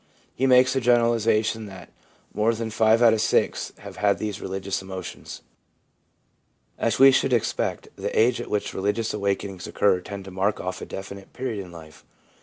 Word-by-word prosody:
He 135 - 0
makes 130 0 +5
the 135 - 0
generalisation 115 -2 +2
that 95 -2 -12 0.2
* - - -34
more 110 +2 +1
than 110 0 -4
five 110 +1 +3
out 115 -2 +7
of 110 - 0
six - - +1
have - - -11
had 100 -1 +2
these 105 -2 -4
religious 95 0 -3
emotions/ 95 -2 -8 1.4
As 115 - 0
we 135 +1 +8
should 130 0 +2
expect, 115 - -1
the - - -2
age 120 +2 +3
at - - -8
which 105 -1 -2
religious 105 +4 -1
awakenings 100 -2 -3
occur 95 -3 +2
tends 100 +1 -8
to 95 - -9
mark 95 +3 0
off 90 0 -5
a - - -7
definite 100 0 -9
period 120 -6 -4
in 90 - -13
life. 80 -2 -13
105 Hz, 180 wpm, -24 LUFS, 95-115 Hz, 1.4 s, we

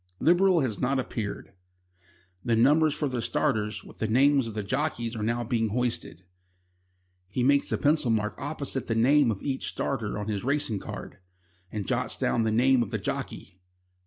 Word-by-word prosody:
Liberal 180 0 +4
has 120 -6 -1
not 135 +2 +1
appeared. 110 -6 -4 0.9
The 115 - +2
numbers 150 +6 +3
of 140 - 0
the 125 -2 -2
starters, 115 -6 -1
with - - -15
the 110 - 0
names 135 +2 +3
of 110 - -7
the 105 - -2
jockeys, 120 -1 -2
are 110 - -4
now 115 +2 0
being 115 -1 0
hoisted. 115 -6 -3 1.0
He 120 +6 -2
makes 140 +2 +3
a - - +1
pencil 150 -3 +2
mark 105 -1 0
opposite 140 -2 -3
the 115 - 0
name 135 +3 +4
of 105 -4 -3
each 135 -2 -2
starter 115 -7 -3
on 105 0 -4
his 105 -2 -2
racing 140 -6 0
card, - - -8 0.5
and 105 -2 -4
jots - - 0
down 120 - +1
the 110 -1 +1
name 125 +3 +4
of 115 - -2
the - - -2
jockey. 90 - -5
120 Hz, 180 wpm, -27 LUFS, 110-140 Hz, 1.0 s, Liberal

